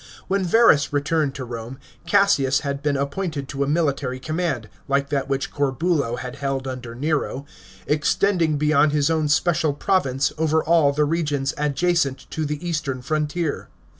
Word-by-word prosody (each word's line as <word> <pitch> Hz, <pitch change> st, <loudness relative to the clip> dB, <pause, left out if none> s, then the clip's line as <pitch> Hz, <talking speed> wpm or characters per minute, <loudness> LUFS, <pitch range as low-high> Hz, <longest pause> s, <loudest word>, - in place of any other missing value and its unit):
When 195 Hz, 0 st, 0 dB
Verus 180 Hz, -6 st, +4 dB
returned 145 Hz, 0 st, 0 dB
to 135 Hz, -2 st, -5 dB
Rome, 120 Hz, +1 st, -7 dB, 0.3 s
Cassius 170 Hz, -10 st, +3 dB
had 140 Hz, -2 st, -3 dB
been 145 Hz, -1 st, 0 dB
appointed 140 Hz, 0 st, -3 dB
to 140 Hz, 0 st, -1 dB
a -, -, -2 dB
military 140 Hz, -4 st, 0 dB
command 155 Hz, -6 st, -2 dB
— -, -, -32 dB
like 140 Hz, 0 st, 0 dB
that 140 Hz, -1 st, -1 dB
which 135 Hz, 0 st, -1 dB
Corbulo 140 Hz, -2 st, 0 dB
had 125 Hz, +2 st, -7 dB
held 135 Hz, -1 st, -2 dB
under 125 Hz, -3 st, -6 dB
Nero 140 Hz, 0 st, -2 dB, 0.2 s
— 95 Hz, 0 st, -21 dB
extending 160 Hz, +1 st, +1 dB
beyond 150 Hz, 0 st, +3 dB
his 150 Hz, +1 st, +2 dB
own 160 Hz, -2 st, +1 dB
special 155 Hz, +1 st, +2 dB
province 140 Hz, -5 st, +1 dB
over 160 Hz, 0 st, +2 dB
ail 165 Hz, -4 st, +4 dB
the 150 Hz, +1 st, +1 dB
regions 145 Hz, -3 st, -1 dB
adjacent 150 Hz, -1 st, 0 dB
to 155 Hz, -, -2 dB
the 150 Hz, +4 st, -4 dB
eastern 140 Hz, -6 st, -2 dB
frontier. 155 Hz, +2 st, -2 dB
145 Hz, 165 wpm, -22 LUFS, 135-160 Hz, 0.3 s, Verus